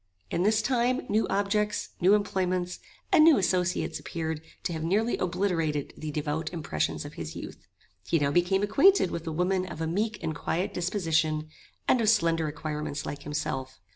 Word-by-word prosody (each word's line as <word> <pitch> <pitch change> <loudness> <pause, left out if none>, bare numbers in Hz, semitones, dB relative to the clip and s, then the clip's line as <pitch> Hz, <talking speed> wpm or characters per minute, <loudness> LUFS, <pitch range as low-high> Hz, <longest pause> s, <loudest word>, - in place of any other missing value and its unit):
In - - 0
this 215 +3 +3
time 250 0 +1
new 215 +2 +2
objects, 205 +1 0
new 190 +4 +6
employments, 185 -3 -1 0.3
and 310 - +7
new 320 -2 +7
associates 180 -1 0
appeared 160 -2 -4 0.2
to 175 - -2
have 160 -1 -4
nearly 210 +8 +1
obliterated 165 -6 -1
the 155 - -6
devout 150 +1 -2
impressions 155 - -2
of - - -8
his - - -7
youth. - - -9 0.4
He 165 - +3
now 140 -2 +1
became 180 +5 +2
acquainted 335 - +4
with 170 0 -5
a - - -1
woman 185 +3 0
of 160 - -8
a 165 - -1
meek 210 +6 -1
and 160 - -1
quiet 180 +5 -2
disposition, 160 -4 0 0.4
and 250 - +4
of 215 - +3
slender 165 -7 +3
acquirements 150 -1 -4
like 145 0 -5
himself. 135 -6 -4
175 Hz, 170 wpm, -28 LUFS, 155-205 Hz, 0.4 s, and